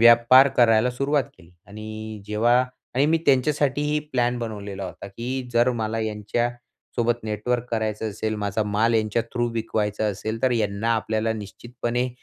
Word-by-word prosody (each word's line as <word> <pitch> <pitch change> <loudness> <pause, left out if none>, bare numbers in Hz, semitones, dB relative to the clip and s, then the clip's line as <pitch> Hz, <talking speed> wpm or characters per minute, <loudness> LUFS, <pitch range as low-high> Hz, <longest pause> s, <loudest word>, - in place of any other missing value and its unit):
व्यापार 120 +3 +7
करायला 115 0 +5
सुरुवात 140 +2 0
केली. 85 -2 -18 0.2
आणि 110 +1 -7
जेव्हा 110 +3 +2 0.4
आणि 135 +4 +3
मी 165 +1 +3
त्यांच्यासाठीही 145 +2 +2
प्लॅन 120 -1 +1
बनवलेला 100 -4 -5
होता, 90 +1 -8
की 125 +5 -5
जर 120 +2 +4
मला 110 +1 -1
यांच्यासोबत 120 +2 -3
नेटवर्क 110 +3 -1
करायचं 110 -1 -1
असेल 110 +1 -3
माझा 105 +1 -1
माल 105 +3 +1
यांच्या 110 +1 +1
थ्रू 120 -1 0
विकवायचा 110 -2 -1
असेल, 110 +3 -3
तर 130 - +3
यांना 110 0 0
आपल्याला 110 0 0
निश्चितपणे 120 +3 -3
115 Hz, 140 wpm, -24 LUFS, 105-120 Hz, 0.4 s, व्यापार